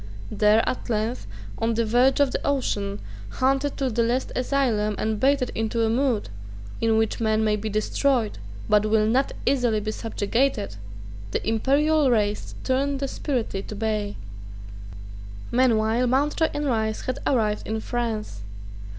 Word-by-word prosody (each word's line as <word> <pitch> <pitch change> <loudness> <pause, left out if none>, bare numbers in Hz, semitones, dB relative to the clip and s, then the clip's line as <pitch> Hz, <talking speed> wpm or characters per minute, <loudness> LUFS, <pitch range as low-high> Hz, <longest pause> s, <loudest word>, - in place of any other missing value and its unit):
There, 210 +1 +3
at 255 - -3
length, 220 - -2 0.3
on 225 0 0
the 230 0 +1
verge 245 +5 +3
of 285 -2 +3
the - - -3
ocean, 205 -8 -1 0.3
hunted 270 +2 0
to 265 -2 0
the 235 +1 +1
last 240 +3 0
asylum, 245 -6 +1
and 220 -1 -1
baited 270 0 +2
into 225 +1 -1
a 220 - +2
mood 245 - 0 0.5
in 225 -1 +3
which 220 -1 0
men 220 -1 +1
may 215 -1 +2
be 215 +1 -4
destroyed, 220 - 0 0.3
but 210 0 +3
will 215 0 +3
not 250 +5 +1
easily 245 -5 +2
be 215 +1 -3
subjugated, 225 - -1 0.5
the - - -3
imperial 280 +6 +3
race 210 -3 0
turned 275 +2 0
desperately 255 -7 -2
to 210 - -8
bay, 210 -1 -2 1.4
Meanwhile 235 -1 +2
Mountjoy 290 +5 +2
and 295 0 -3
Rice 220 -4 0
had 255 +1 -3
arrived 215 -5 +1
in 220 0 -2
France. 220 - -3
230 Hz, 145 wpm, -24 LUFS, 215-260 Hz, 1.4 s, There